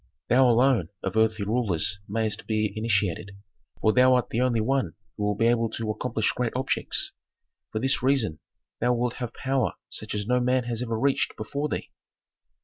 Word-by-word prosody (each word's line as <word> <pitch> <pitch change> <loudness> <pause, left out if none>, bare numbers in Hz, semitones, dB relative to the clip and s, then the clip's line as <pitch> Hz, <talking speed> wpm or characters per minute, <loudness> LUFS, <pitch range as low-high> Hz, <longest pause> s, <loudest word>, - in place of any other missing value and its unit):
Thou, 130 +1 +5
alone, 120 - +3
of 95 +2 -3
earthly 110 -2 +2
rulers 100 -5 0
mayst 110 0 -2
be 110 -1 0
initiated, 100 -3 -1 0.4
for 110 - +3
thou 130 0 +6
art 125 - 0
the 115 - 0
only 125 -3 +2
one 135 +4 0 0.2
who 105 - -4
will 105 0 +1
be 115 - +1
able 115 -1 +2
to 110 0 -3
accomplish 110 0 -1
great 125 -2 -2
objects. 130 +1 0 0.6
For - - -3
this 135 +4 +2
reason 125 - +1 0.4
thou 120 +1 +2
wilt 120 0 -1
have 120 -3 -4
power 135 0 0 0.2
such - - -4
as 105 -1 -2
no 125 +3 +2
man 125 +1 +2
has 120 -1 -3
ever 115 -2 -2
reached 140 +2 +1
before 140 +7 -3
thee." - - -4
115 Hz, 180 wpm, -26 LUFS, 110-125 Hz, 0.6 s, thou